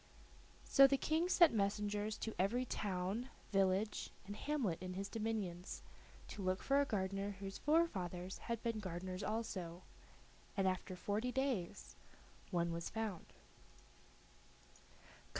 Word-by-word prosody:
So 275 Hz, 0 st, +9 dB
the 275 Hz, 0 st, +3 dB
King 320 Hz, +5 st, +1 dB
sent 340 Hz, -6 st, +7 dB
messengers 210 Hz, 0 st, 0 dB
to 225 Hz, -, -3 dB
every 235 Hz, +7 st, +2 dB
town, 205 Hz, +3 st, -2 dB, 0.2 s
village, 195 Hz, +1 st, +2 dB, 0.2 s
and 205 Hz, +1 st, -5 dB
hamlet 240 Hz, -, -1 dB
in 185 Hz, 0 st, -4 dB
his 195 Hz, +1 st, -2 dB
dominions, 205 Hz, -5 st, -3 dB, 0.5 s
to 205 Hz, -, -6 dB
look 185 Hz, 0 st, 0 dB
for 275 Hz, +1 st, +4 dB
a -, -, +2 dB
gardener 195 Hz, 0 st, -1 dB
whose 195 Hz, 0 st, -5 dB
forefathers 190 Hz, -, +1 dB
had 230 Hz, -1 st, -3 dB
been 230 Hz, -2 st, 0 dB
gardeners 185 Hz, -1 st, -4 dB
also, 190 Hz, -6 st, -3 dB, 0.7 s
and 195 Hz, -1 st, +3 dB
after 185 Hz, 0 st, -1 dB
forty 210 Hz, +6 st, -1 dB
days 250 Hz, -8 st, -1 dB, 0.5 s
one 170 Hz, -2 st, +1 dB
was 170 Hz, 0 st, -3 dB
found. 220 Hz, -5 st, -3 dB
205 Hz, 125 wpm, -39 LUFS, 185-230 Hz, 0.7 s, So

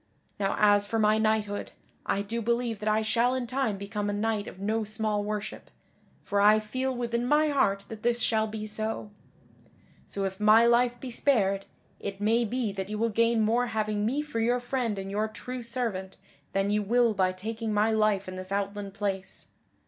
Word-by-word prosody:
Now 195 Hz, -1 st, 0 dB
as 205 Hz, -1 st, +4 dB
for 225 Hz, -, -1 dB
my 215 Hz, 0 st, +3 dB
knighthood, 215 Hz, -2 st, 0 dB, 0.3 s
I 200 Hz, -, 0 dB
do 230 Hz, +3 st, -3 dB
believe 235 Hz, -1 st, -1 dB
that 215 Hz, -, -1 dB
I 215 Hz, +1 st, +2 dB
shall 235 Hz, +3 st, +2 dB
in 255 Hz, -1 st, -2 dB
time 255 Hz, -4 st, -1 dB
become 205 Hz, +1 st, -3 dB
a -, -, -1 dB
knight 210 Hz, 0 st, -1 dB
of -, -, -9 dB
no 220 Hz, +3 st, 0 dB
small 215 Hz, -1 st, -1 dB
worship, 210 Hz, 0 st, -5 dB, 0.5 s
for 200 Hz, 0 st, 0 dB
I 210 Hz, +1 st, +7 dB
feel 255 Hz, +5 st, -2 dB
within 235 Hz, -1 st, -1 dB
my 300 Hz, +4 st, +3 dB
heart 200 Hz, -9 st, +1 dB
that 220 Hz, -1 st, -8 dB
this 240 Hz, 0 st, +1 dB
shall 220 Hz, -2 st, +1 dB
be 215 Hz, 0 st, -5 dB
so. 215 Hz, 0 st, -3 dB, 1.0 s
So 200 Hz, -1 st, -3 dB
if 190 Hz, +1 st, -4 dB
my 215 Hz, +2 st, +6 dB
life 240 Hz, +1 st, +3 dB
be 255 Hz, 0 st, -6 dB
spared, 200 Hz, -7 st, +2 dB, 0.3 s
it 200 Hz, -1 st, -5 dB
may 225 Hz, +3 st, +2 dB
be 235 Hz, -1 st, -1 dB
that 195 Hz, 0 st, -5 dB
you 210 Hz, -, -3 dB
will 230 Hz, +2 st, +1 dB
gain 230 Hz, +1 st, +2 dB
more 235 Hz, +3 st, +2 dB
having 215 Hz, -2 st, -1 dB
me 270 Hz, +7 st, 0 dB
for 300 Hz, -7 st, -4 dB
your 240 Hz, +2 st, +2 dB
friend 245 Hz, -3 st, -2 dB
and 195 Hz, 0 st, -5 dB
your 210 Hz, +2 st, 0 dB
true 250 Hz, +3 st, -7 dB
servant 230 Hz, -6 st, -3 dB, 0.3 s
than 195 Hz, +1 st, 0 dB
you 210 Hz, 0 st, +2 dB
will 235 Hz, +2 st, +3 dB
by 185 Hz, -2 st, +2 dB
taking 220 Hz, +4 st, -4 dB
my 210 Hz, +1 st, +2 dB
life 215 Hz, -3 st, +2 dB
in 185 Hz, 0 st, -6 dB
this 185 Hz, +1 st, -7 dB
outland 200 Hz, 0 st, -3 dB
place. 195 Hz, -2 st, -4 dB
215 Hz, 195 wpm, -28 LUFS, 205-235 Hz, 1.0 s, I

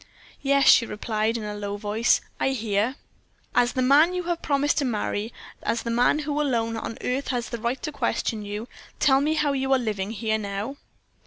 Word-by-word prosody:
"Yes," 280 Hz, 0 st, +3 dB
she 230 Hz, -, +7 dB
replied, 215 Hz, +1 st, -1 dB
in 225 Hz, -, -5 dB
a 210 Hz, 0 st, -4 dB
low 205 Hz, 0 st, -4 dB
voice, 215 Hz, +3 st, +2 dB, 0.2 s
"I -, -, +2 dB
hear." 220 Hz, +1 st, 0 dB, 0.6 s
"As 245 Hz, 0 st, +3 dB
the 255 Hz, -, +1 dB
man 300 Hz, +7 st, +5 dB
you 360 Hz, -, -2 dB
have 345 Hz, -1 st, -2 dB
promised 290 Hz, 0 st, +1 dB
to -, -, 0 dB
marry, 215 Hz, -1 st, -2 dB, 0.3 s
as 230 Hz, -, -1 dB
the 235 Hz, -, -2 dB
man 245 Hz, +5 st, +3 dB
who 300 Hz, 0 st, -1 dB
alone 230 Hz, -5 st, 0 dB
on 225 Hz, -, -5 dB
earth 260 Hz, +3 st, -2 dB
has 245 Hz, -2 st, -2 dB
the 235 Hz, -, -4 dB
right 240 Hz, +3 st, -1 dB
to 305 Hz, -, -2 dB
question 225 Hz, -6 st, -1 dB
you, 205 Hz, +3 st, -5 dB, 0.3 s
tell 270 Hz, -1 st, +4 dB
me 305 Hz, +2 st, +1 dB
how 300 Hz, -2 st, +1 dB
you 265 Hz, 0 st, -1 dB
are -, -, +5 dB
living 210 Hz, -5 st, -2 dB
here 220 Hz, 0 st, -1 dB
now?" 205 Hz, +6 st, -4 dB
240 Hz, 200 wpm, -25 LUFS, 215-280 Hz, 0.6 s, she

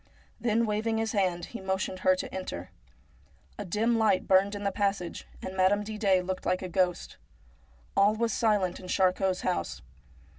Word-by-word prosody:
Then 230 Hz, 0 st, +2 dB
waving 220 Hz, +1 st, 0 dB
his 225 Hz, 0 st, -1 dB
hand 185 Hz, -5 st, 0 dB
he 235 Hz, -, -8 dB
motioned 190 Hz, -1 st, -2 dB
her 185 Hz, 0 st, +4 dB
to 185 Hz, -, -6 dB
enter. 95 Hz, -, -5 dB, 0.9 s
A 205 Hz, -, -4 dB
dim 225 Hz, +6 st, +1 dB
light 215 Hz, -4 st, +2 dB
burned 195 Hz, +2 st, +4 dB
in 205 Hz, -, -5 dB
the 200 Hz, -, 0 dB
passage, 195 Hz, -3 st, -2 dB, 0.2 s
and 185 Hz, -, -5 dB
Madame 190 Hz, +2 st, +3 dB
Didet 205 Hz, -4 st, +1 dB
looked 185 Hz, 0 st, -3 dB
like 185 Hz, +1 st, 0 dB
a 185 Hz, -, -4 dB
ghost. 180 Hz, 0 st, 0 dB, 0.8 s
All 205 Hz, +2 st, +4 dB
was 230 Hz, 0 st, 0 dB
silent 205 Hz, -5 st, +1 dB
in 185 Hz, -, -10 dB
Charcot's 185 Hz, 0 st, +1 dB
house. 85 Hz, -7 st, -2 dB
190 Hz, 170 wpm, -29 LUFS, 185-210 Hz, 0.9 s, her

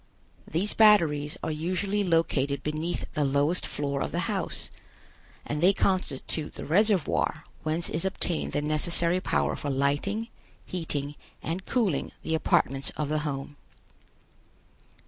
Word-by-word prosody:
These 185 Hz, +7 st, +1 dB
batteries 165 Hz, -9 st, +4 dB
are -, -, -1 dB
usually 185 Hz, +6 st, -1 dB
located 155 Hz, -6 st, +1 dB
beneath 155 Hz, +3 st, -2 dB
the 150 Hz, -, +1 dB
lowest 145 Hz, +5 st, +1 dB
floor 140 Hz, -1 st, -2 dB
of -, -, -2 dB
the -, -, -1 dB
house, -, -, -3 dB, 0.7 s
and 150 Hz, +1 st, -3 dB
they 185 Hz, +3 st, +6 dB
constitute 165 Hz, -5 st, -1 dB
the -, -, -6 dB
reservoir 195 Hz, +1 st, +2 dB, 0.2 s
whence 155 Hz, +2 st, -1 dB
is 160 Hz, -, -2 dB
obtained 180 Hz, -3 st, -1 dB
the 145 Hz, -, 0 dB
necessary 170 Hz, +3 st, +2 dB
power 70 Hz, -, 0 dB
for 145 Hz, -, -4 dB
lighting, 145 Hz, -, 0 dB, 0.4 s
heating 145 Hz, -5 st, -3 dB, 0.3 s
and 175 Hz, +4 st, -4 dB
cooling 205 Hz, -, 0 dB
the 160 Hz, -, -2 dB
apartments 135 Hz, -3 st, +2 dB
of 150 Hz, -2 st, -1 dB
the 155 Hz, 0 st, +1 dB
home. 145 Hz, -1 st, -4 dB
155 Hz, 130 wpm, -27 LUFS, 145-180 Hz, 0.7 s, they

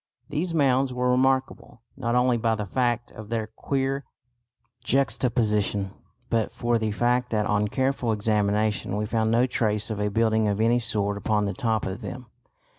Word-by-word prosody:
These 160 Hz, +4 st, -1 dB
mounds 135 Hz, -4 st, +2 dB
were 125 Hz, 0 st, 0 dB
remarkable 130 Hz, -2 st, 0 dB
not 120 Hz, 0 st, -1 dB
only 125 Hz, 0 st, +3 dB
by 115 Hz, -1 st, +1 dB
the 105 Hz, -1 st, -3 dB
fact 120 Hz, +2 st, -1 dB
of 110 Hz, -1 st, -10 dB
their 115 Hz, -1 st, -1 dB
queer 135 Hz, +5 st, -2 dB, 0.8 s
juxtaposition 105 Hz, -7 st, +1 dB, 0.4 s
but 115 Hz, -2 st, 0 dB
for 120 Hz, -1 st, 0 dB
the 110 Hz, -1 st, -1 dB
fact 120 Hz, +3 st, +1 dB
that 105 Hz, -2 st, 0 dB
on 105 Hz, 0 st, +1 dB
careful 130 Hz, 0 st, 0 dB
examination 105 Hz, -1 st, 0 dB
we 105 Hz, -, -1 dB
found 110 Hz, 0 st, 0 dB
no 120 Hz, +2 st, +4 dB
trace 110 Hz, -3 st, 0 dB
of 105 Hz, -, -3 dB
a 105 Hz, 0 st, 0 dB
building 110 Hz, 0 st, +2 dB
of 100 Hz, 0 st, 0 dB
any 115 Hz, +2 st, +3 dB
sort 100 Hz, -3 st, 0 dB
upon 105 Hz, 0 st, +1 dB
the 100 Hz, -, -2 dB
top 115 Hz, -5 st, -1 dB
of 95 Hz, +5 st, -5 dB
them. 120 Hz, +4 st, -7 dB
115 Hz, 170 wpm, -25 LUFS, 105-125 Hz, 0.8 s, no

